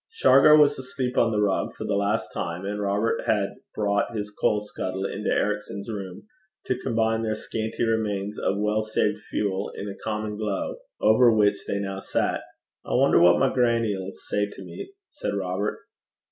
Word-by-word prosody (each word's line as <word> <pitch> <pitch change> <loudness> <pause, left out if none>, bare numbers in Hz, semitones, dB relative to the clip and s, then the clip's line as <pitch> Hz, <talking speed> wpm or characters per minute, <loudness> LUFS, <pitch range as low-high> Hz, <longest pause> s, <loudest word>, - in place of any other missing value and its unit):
Shargar 150 - +6
was 145 -2 +4
asleep 125 -1 -3
on 115 - +4
the 105 - 0
rug 100 -2 0
for - - -6
the 105 - -1
last 100 +2 0
time, 85 +3 -4
and 105 +1 -3
Robert 100 +3 0
had 100 -2 +2 0.3
brought 100 +1 0
his 105 0 -4
coal 105 0 +1
scuttle 95 -2 -4
into 105 +2 -3
Ericson's 105 0 -1
room 95 -4 -6 0.4
to 130 - -1
combine 110 0 0
their 110 -1 -1
scanty 110 +1 -3
remains 105 -2 -1
of 100 - 0
well 105 +1 +1
saved 105 -1 0
fuel 100 -1 -1
in 100 - -5
a 100 - -8
common 105 -1 -3
glow, 105 -3 -2 0.2
over 115 +3 +5
which 105 -2 +2
they 100 - -1
now 95 -1 -3
sat. - - -1 0.4
'I - - -2
wonder - - +5
what 85 0 +7
my 135 - +2
grannie 115 -3 +2
'ill 95 -1 -5
say 105 +1 -2
to 95 - -10
me,' 90 - -8 0.2
said 100 - -4
Robert. 95 +1 -2
105 Hz, 180 wpm, -25 LUFS, 100-110 Hz, 0.4 s, what